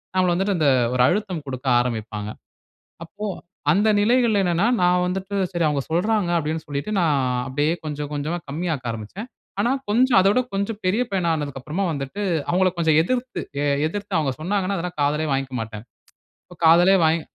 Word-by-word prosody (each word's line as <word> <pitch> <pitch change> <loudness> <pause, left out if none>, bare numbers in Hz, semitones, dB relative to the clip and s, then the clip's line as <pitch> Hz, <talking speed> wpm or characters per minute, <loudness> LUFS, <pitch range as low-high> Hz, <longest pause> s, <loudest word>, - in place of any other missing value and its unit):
நம்மள 185 -1 +3
வந்துட்டு 195 +2 0
அந்த 150 -3 +3 0.3
ஒரு 125 - +4
அழுத்தம் 185 -5 -1
குடுக்க 130 0 -6
ஆரம்பிப்பாங்க. 110 -3 -3 0.8
அப்போ 210 +5 -7 0.5
அந்த 210 +3 +3
நிலைகள்ல 230 -2 +3
என்னனென்னா, 175 +4 +2 0.2
நான் 180 0 +3
வந்துட்டு 190 +2 -3 0.2
சரி 175 -1 -1
அவுங்க 140 -3 -1
சொல்றாங்க 190 +2 +1
அப்பிடின்னு 160 0 -3
சொல்லிட்டு, 145 +8 -4
நான் 155 -5 +2 0.3
அப்பிடியே 145 +5 0
கொஞ்சம் 150 -1 -4
கொஞ்சமா 150 +4 -2
கம்மி 165 +5 -3
ஆக்க 125 -4 -4
ஆரம்பிச்சேன். 115 - -7 0.3
ஆனா, 240 +4 +1 0.2
கொஞ்சம் 245 +1 +4
அத 190 - +4
விட 250 - +3
கொஞ்சம் 200 +2 -2
பெரிய 210 +7 +2
பையனா 180 -3 0
ஆனதுக்கு 145 -3 -4
அப்புறமா 170 +9 -3
வந்துட்டு 145 +7 -5 0.3
அவுங்கள 185 +1 +3
கொஞ்சம் 160 -2 +3
எதிர்த்து 250 +6 -2 0.2
எ - - +1 0.2
எதிர்த்து 200 +1 -4
அவுங்க 145 -4 0
சொன்னாங்கன்னா, 195 +3 -1
அதெல்லாம் 175 0 -5
காதிலே 150 +2 +1
வாங்கிக்கமாட்டேன். 115 -5 -3 0.6
இப்ப 180 - -16
காதலே 175 +4 +6
வாங் 160 +1 +2
170 Hz, 165 wpm, -22 LUFS, 145-200 Hz, 0.8 s, காதலே